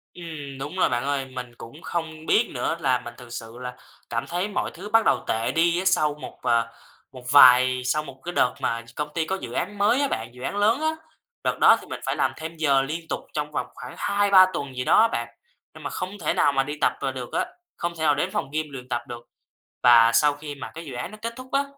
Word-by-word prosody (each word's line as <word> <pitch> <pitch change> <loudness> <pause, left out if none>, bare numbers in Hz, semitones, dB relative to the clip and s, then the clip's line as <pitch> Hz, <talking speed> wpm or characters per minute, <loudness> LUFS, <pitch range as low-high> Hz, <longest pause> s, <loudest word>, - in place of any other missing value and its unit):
Ừm, 150 -6 -8
đúng 145 +6 -6
rồi, 185 - +3
bạn 120 +1 -1
ơi. 140 -1 -1
Mình 125 -2 -7
cũng 130 +9 -11
không 160 -2 -4
biết 230 +7 +3
nữa - - -1
là 130 -2 +2
mình 120 - -7
thực 125 -1 -12
sự 115 0 -8
là 125 0 -6 0.3
cảm 115 0 -2
thấy 180 +4 -1
mọi 205 - -2
thứ 195 +5 -8
bắt 225 0 +4
đầu 125 - +2
tệ 115 +1 0
đi 170 +2 +2
á, 190 - -3
sau 155 -6 +3
một, 150 - -10
ờ, 115 -1 +2 0.4
một 125 -1 -12
vài 130 -2 +7
sau 150 +4 0
một 135 -2 -12
cái 175 - -4
đợt 125 - +2
mà 115 0 -1
công 150 0 -3
ty 160 -1 0
có 190 +4 -1
dự - - -6
án 205 0 -3
mới 215 +7 +3
á 280 - +2
bạn, 115 - -3
dự 125 - -13
án 200 - -3
lớn 220 +8 +3
á. 315 0 +1 0.5
Đợt - - -1
đó - - +7
thì - - -14
mình - - -6
phải - - -1
làm - - +1
thêm 160 +1 -6
giờ 140 -4 +3
liên 160 +4 -4
tục - - -2
trong 150 0 -3
vòng - - -2
khoảng 125 0 -9
2-3 200 -2 +5
tuần 140 -5 -4
gì 125 - -2
đó - - +6
á 230 - +6
bạn, 120 - -3 0.5
nhưng 155 -1 -12
mà 145 - -3
không 185 +2 -5
thể 155 - 0
nào 145 - +3
mà 135 -1 +2
đi 145 +2 -5
tập, - - +3
à, 135 - -1
được 125 -2 -7
á, - - +1 0.3
không 170 0 -3
thể 160 - -4
nào 150 -2 +4
đến 150 - -1
phòng 135 - -2
gym 155 0 0
luyện 130 -2 -9
tập 120 -1 -1
được. 120 0 -9 0.6
Và 115 -1 +7
sau 150 -1 +4
khi 145 0 -8
mà - - -8
cái 165 0 -7
dự 135 - -8
án 125 +9 -5
nó 215 - -10
kết 230 +1 -3
thúc 255 0 -11
á, 275 +1 +2
150 Hz, 265 wpm, -24 LUFS, 125-175 Hz, 0.6 s, vài